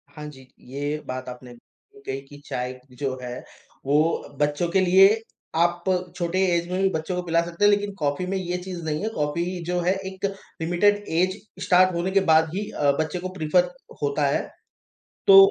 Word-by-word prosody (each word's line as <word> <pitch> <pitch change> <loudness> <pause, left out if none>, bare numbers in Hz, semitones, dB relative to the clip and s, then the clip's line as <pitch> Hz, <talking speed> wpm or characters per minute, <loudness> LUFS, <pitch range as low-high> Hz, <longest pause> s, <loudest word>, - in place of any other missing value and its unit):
हाँ 150 -1 -7
जी। 130 -3 -14 0.2
ये 145 +3 -2
बात 130 0 -5
आपने 125 0 -10 0.5
कही 135 +1 -3
कि 145 - -12
चाय 125 +1 -4 0.2
जो 135 -2 -2
है 125 0 -5 0.5
वो 140 +2 +3 0.4
बच्चों 145 +3 +1
के 190 - +2
लिए 190 +1 +7 0.5
आप 175 +1 +2 0.3
छोटे 175 +1 -1 0.2
एज 170 0 -1
में 185 +1 0
भी 195 - +4
बच्चों 160 +3 -2
को 180 - -1
पिला 170 0 +2
सकते 170 +3 -4
हैं - - +7
लेकिन 205 0 0
कॉफ़ी 145 +4 0
में 195 +1 -1
ये 180 -1 -2
चीज़ 180 -2 -6
नहीं 155 -1 -1
है। 220 - 0
कॉफ़ी 150 -4 -1 0.2
जो 180 +1 0
है 180 +2 +2
एक 190 0 -4 0.4
लिमिटेड 205 +5 +2
एज 185 +3 +2 0.3
स्टार्ट 185 0 +5
होने 175 +2 -1
के 195 - +4
बाद 160 0 +5
ही 205 +1 -3
अ, 145 -1 +2
बच्चे 160 +3 -1
को 185 +1 -4
प्रेफर 175 +3 +2 0.3
होता 145 0 +1
है। 140 - +1 0.9
तो 395 -1 +10
170 Hz, 190 wpm, -24 LUFS, 145-185 Hz, 0.9 s, तो